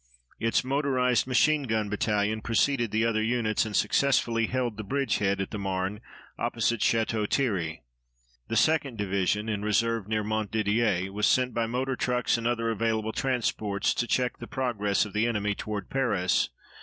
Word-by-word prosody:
Its 115 +2 +1
motorized 130 -2 +1
machine 150 +4 +3
gun 110 -5 -1
battalion 105 +1 0
preceded 120 +2 +1
the 110 +2 +1
other 110 -1 +1
units 110 -1 0
and 105 - -5
successfully 115 0 +2
held 125 -3 -1
the 110 - -6
bridgehead 100 -5 0
at 95 - -3
the 105 - -4
Marne, 95 +2 -2 0.4
opposite 115 -1 0
Château 110 -1 +1
Thierry. 90 - -1 0.6
The - - -3
2d 140 0 +2
Division, 100 +1 0
in 105 -2 -2
reserve 110 0 0
near 110 0 0
Montdidier, 105 -2 0
was 105 +1 +1
sent 125 -1 +2
by 115 -1 0
motor 130 +3 -1
trucks 125 -1 0
and 115 0 -1
other 115 -1 0
available 110 0 -1
transport 110 -6 -1
to 120 - +1
check 125 -1 0
the - - -8
progress 110 -8 0
of 105 - -9
the 105 +2 +1
enemy 105 -3 0
toward 105 0 -5
Paris. 105 -9 +1
110 Hz, 160 wpm, -27 LUFS, 105-125 Hz, 0.6 s, machine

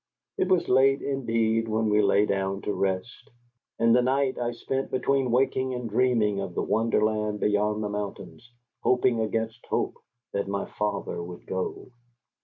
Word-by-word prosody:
It - - 0
was 185 -2 +2
late 135 +2 +4
indeed 115 -4 0
when 110 0 0
we 105 0 +4
lay 100 0 +4
down 95 -1 -1
to 105 - -1
rest, 95 +4 -3 0.5
and 115 0 +4
the 125 - +5
night 130 +1 +1
I 120 -1 -1
spent 135 +3 -3
between 130 0 +1
waking 130 +1 +1
and 125 -1 -4
dreaming 110 -3 +2
of 95 -3 -5
the - - 0
wonderland 110 -1 +1
beyond 105 +1 +1
the 105 - -2
mountains, 105 +3 -6 0.3
hoping 125 -2 +2
against 110 +2 -2
hope - - -1 0.3
that 100 0 -1
my 100 0 -2
father 105 -4 -3
would 85 +1 -9
go. 95 +6 -4
110 Hz, 160 wpm, -26 LUFS, 105-125 Hz, 0.5 s, the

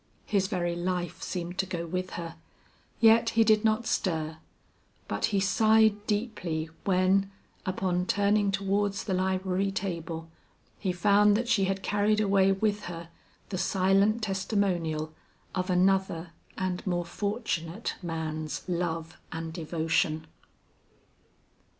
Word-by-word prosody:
His 195 -2 +1
very 175 -2 -1
life 175 0 -2
seemed 175 0 -4
to 190 - +1
go 175 -2 -3
with 185 +2 -3
her, 165 -1 -5 0.6
yet 230 +1 +6
he 225 - +7
did 215 -1 +4
not 220 +1 +2
stir; 160 -7 -1 0.7
but - - 0
he 205 -3 +1
sighed 215 +1 +3
deeply 185 -8 -2
when, 195 +1 +3 0.4
upon 180 -1 0
turning 205 0 +2
towards 200 +1 0
the 195 - -2
library 190 +1 0
table, 165 -4 -4 0.5
he 190 - 0
found 205 +3 +4
that 240 +1 -2
she 200 -5 +3
had 195 0 -2
carried 205 +1 +2
away 195 -2 +4
with 210 +1 0
her 170 -1 -7 0.4
the 185 - -3
silent 195 +4 +2
testimonial 185 -6 -1 0.4
of 185 0 -2
another 180 -2 +2 0.3
and 185 -1 -2
more 175 -1 0
fortunate 200 -1 -3
man's 155 -2 -4
love 170 -2 -2
and 160 0 -5
devotion. 160 -1 0
190 Hz, 125 wpm, -28 LUFS, 170-205 Hz, 0.7 s, he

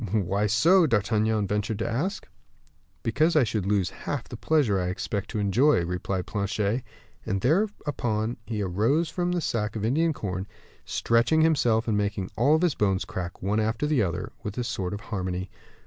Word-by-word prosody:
"Why 100 0 +1
so?" 165 - +5
D'Artagnan 110 -2 +1
ventured 105 +1 -1
to 115 - -2
ask. 160 - -2 0.8
"Because 155 +9 +2
I 150 - +6
should 105 -4 -2
lose 100 -3 +1
half 140 -4 -4
the - - -7
pleasure 120 -6 +2
I 90 - -1
expect 100 +2 -3
to 115 - -4
enjoy," 105 - +3
replied 90 +1 -2
Planchet. 105 +3 -1 0.4
And 100 - -1
thereupon 125 - 0
he 105 -2 -2
rose 115 - +1
from 175 -1 -1
his 175 -2 -1
sack 105 -1 -1
of 110 -1 -2
Indian 160 +8 +2
corn, 95 -8 -4 0.4
stretching 115 +7 +2
himself, 120 -8 +3
and 110 - +1
making 100 -2 -2
all 145 +7 +4
his 175 -3 +2
bones 95 -4 0
crack, 90 -1 -6
one 105 +3 +1
after 110 +5 0
the 150 -5 +2
other, 90 +1 -2
with 105 -1 -6
a 125 - 0
sort 95 -4 -3
of 105 - -8
harmony. 95 -4 -4
110 Hz, 175 wpm, -26 LUFS, 100-140 Hz, 0.8 s, I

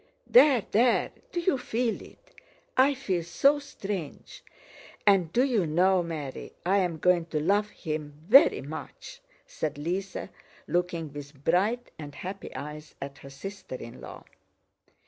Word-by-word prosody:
"There, 285 - +6
there! 235 +3 +3 0.2
Do 345 - -1
you 340 -6 +1
feel 235 -1 -1
it? - - -17 0.4
I 275 +2 +5
feel 195 -10 -1
so 275 - +3
strange. 195 - -6 0.6
And 190 -5 +4
do 245 - +3
you 230 -10 +1
know, 180 +4 +3
Mary, 155 -6 -6
I 190 +3 +3
am 175 -4 0
going 175 0 +2
to 155 -2 -1
love 200 +6 +2
him 155 -6 -5
very 275 +9 +7
much," 155 +3 -8 0.2
said 150 -2 -4
Lise, 180 +6 -3 0.5
looking 170 -2 -1
with 140 -1 -10
bright 205 +10 +1
and 145 -2 -8
happy 190 +2 -7
eyes 150 +3 -7
at 140 0 -7
her 135 - -11
sister 195 +2 -8
in 115 -2 -9
law. - - -10
180 Hz, 145 wpm, -28 LUFS, 150-215 Hz, 0.6 s, very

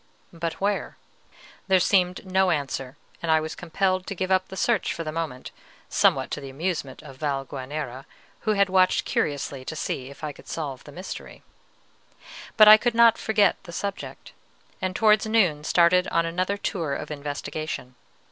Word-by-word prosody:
But 165 -1 -3
where? 200 0 -2 0.7
There 190 -1 +5
seemed 180 0 +2
no 190 0 +2
answer; 135 -4 -2 0.2
and 165 -2 0
I 160 - +5
was 155 0 -4
compelled 185 +2 -1
to 195 - -4
give 185 +1 -2
up 185 0 +2
the 190 - -9
search 230 -1 +1
for 165 - -4
the 155 - -4
moment, 155 -6 -5 0.4
somewhat - - +2
to 150 - -3
the 135 - -8
amusement 145 -1 -4
of 135 -3 -12
Valguanera, 135 -2 -4 0.3
who 215 - 0
had 200 -1 +3
watched 185 -1 +3
curiously 140 -2 -2
to 155 - -6
see 130 -3 -3
if 140 - -14
I 150 - -2
could - - -16
solve 140 -6 -5
the 145 - -11
mystery. 180 +6 -8 1.1
But 215 -1 +9
I 215 0 +11
could 240 +1 -1
not 230 -1 +6
forget 210 -4 +3
the 175 - -11
subject, 200 +3 -6 0.5
and 185 -1 -2
towards 215 -1 +4
noon 185 -10 +2
started 175 +3 +4
on 165 0 +1
another 185 +4 -1
tour 165 -8 -2
of 150 - -6
investigation. 145 -2 -5
170 Hz, 170 wpm, -25 LUFS, 145-190 Hz, 1.1 s, I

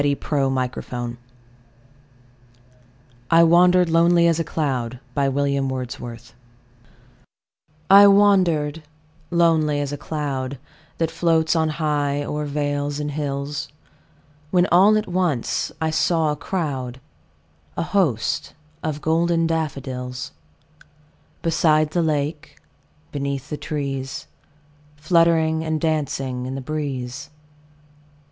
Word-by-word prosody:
William 140 -1 0
Wordsworth 125 -1 -4 2.2
I 165 0 +6
Wandered 180 +2 +5
Lonely 170 +1 +4
As 170 -1 +3
a - - +1
Cloud 130 -7 -2 2.9
I 200 +1 +9
WANDERED 180 -7 +3 0.5
lonely 160 -4 +3
as 145 -1 -2
a 145 - -4
cloud 140 -4 -3 0.4
That 165 -1 -1
floats 165 -1 +2
on 160 -1 +2
high 145 -2 -1
o'er 150 +1 -3
vales 145 0 -2
and 150 0 -3
hills, 140 0 -3 0.8
When 180 +1 +3
all 195 +5 +6
at 215 - -2
once 175 -9 -1
I 160 -1 0
saw 160 -1 +1
a - - -2
crowd, 140 -6 -4 0.8
A - - 0
host, 170 - 0 0.3
of 150 -1 -3
golden 165 +1 +1
daffodils; 130 -6 -3 1.1
Beside 155 -2 +2
the 175 - +1
lake, 150 -1 -2 0.5
beneath 140 0 -4
the - - -1
trees, 135 -3 -4 0.7
Fluttering 160 0 +2
and 160 -1 -1
dancing 135 -5 -2
in 130 - -4
the - - -4
breeze. 135 -3 -4
150 Hz, 100 wpm, -22 LUFS, 140-165 Hz, 2.9 s, I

